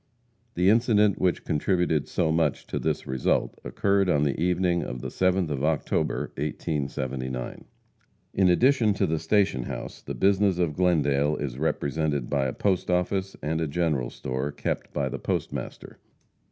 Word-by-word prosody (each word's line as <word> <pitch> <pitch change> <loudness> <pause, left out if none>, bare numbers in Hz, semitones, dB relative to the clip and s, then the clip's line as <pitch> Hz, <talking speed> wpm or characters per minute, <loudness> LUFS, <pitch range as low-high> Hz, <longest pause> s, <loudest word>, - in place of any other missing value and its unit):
The 90 +1 +2
incident 105 -2 +4
which 90 -2 +1
contributed 80 -1 +1
so 80 -3 0
much 80 +1 0
to - - -3
this - - -1
result 65 -1 0
occurred 100 +9 +1
on 75 -4 +3
the 70 -2 +1
evening 90 0 +1
of 60 - -5
the - - -4
7th 95 -3 +1
of 70 -1 -2
October, 80 -1 0
1879. 70 -4 -3 0.7
In 95 -2 +3
addition 115 +2 +4
to - - +1
the 80 0 -1
station 80 - +1
house, - - -6
the - - -6
business 100 -1 +3
of 85 -4 0
Glendale 75 -4 +2
is 65 -3 -4
represented 75 -3 -1
by 70 -2 +1
a 65 - -3
post 95 -3 0
office 95 +2 0
and 80 +2 -1
a 80 - 0
general 75 -5 0
store, 65 +3 -3
kept 70 - -3
by - - -1
the - - -5
postmaster. - - -4
80 Hz, 155 wpm, -26 LUFS, 70-95 Hz, 0.7 s, incident